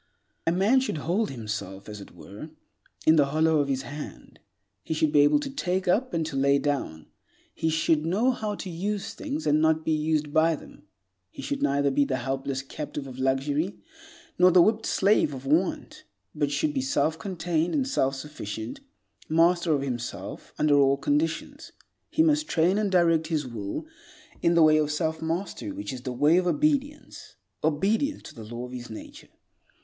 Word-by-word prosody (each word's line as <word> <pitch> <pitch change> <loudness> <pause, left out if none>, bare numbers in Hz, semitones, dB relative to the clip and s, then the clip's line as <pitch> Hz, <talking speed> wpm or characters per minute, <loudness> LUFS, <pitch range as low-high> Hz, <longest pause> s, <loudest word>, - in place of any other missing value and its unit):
A - - +4
man 200 +9 +3
should 260 -10 -2
hold 180 +9 0
himself, 105 -5 -6
as 105 -1 -8
it - - -11
were, 105 +11 -10 0.6
in 160 +1 +6
the 145 -2 +4
hollow 155 +2 +2
of 145 - +1
his 135 -1 -1
hand. 145 +4 -9 0.4
He 160 - -3
should 155 -1 +1
be 145 - +4
able 145 - +5
to 280 - -4
take 185 -8 -2
up 245 +8 +2
and 165 -2 -1
to 155 -3 -5
lay 140 +1 +3
down. 140 - -2 0.5
He 160 - -1
should 160 -1 +2
know 205 +10 +2
how 215 -4 -3
to 190 - -7
use 195 +4 -3
things, 295 +1 -5
and 150 +1 +3
not 160 0 +2
be - - +1
used 155 -1 0
by 160 +1 +4
them. - - -15 0.4
He - - -10
should 285 -1 -3
neither 140 - +2
be 140 +1 +3
the 130 -2 -1
helpless 135 +1 -3
captive 145 0 -6
of 130 -1 -9
luxury 140 +7 0 0.6
nor 180 0 +7
the 180 -1 +6
whipped 220 +2 +1
slave 195 -7 +2
of 130 +1 -9
want, 185 - 0 0.3
but 145 -2 0
should 300 - 0
be 270 - 0
self 160 - 0
contained 175 - -1
and 270 -3 +1
self 135 - +1
sufficient, 130 - -6 0.5
master 170 +1 +3
of 140 -2 +1
himself 120 -3 -5
under 145 -2 +4
all 140 0 +4
conditions. 150 +4 -2 0.4
He 320 - +3
must 305 -1 +2
train 180 - +2
and 205 -2 0
direct 165 -3 +3
his 155 -3 -1
will 110 - -5 0.6
in 170 0 +3
the 165 - +6
way 155 0 +6
of 150 -1 +1
self 160 +1 -2
mastery 170 - -3
which 290 - -6
is 125 - -7
the 130 0 -4
way 145 +7 +3
of 180 0 +1
obedience—obedience 280 - -1
to - - -11
the 115 - -10
law 120 +3 -6
of 125 - -10
his 120 -2 -7
nature. 110 - -10
155 Hz, 185 wpm, -26 LUFS, 140-185 Hz, 0.6 s, nor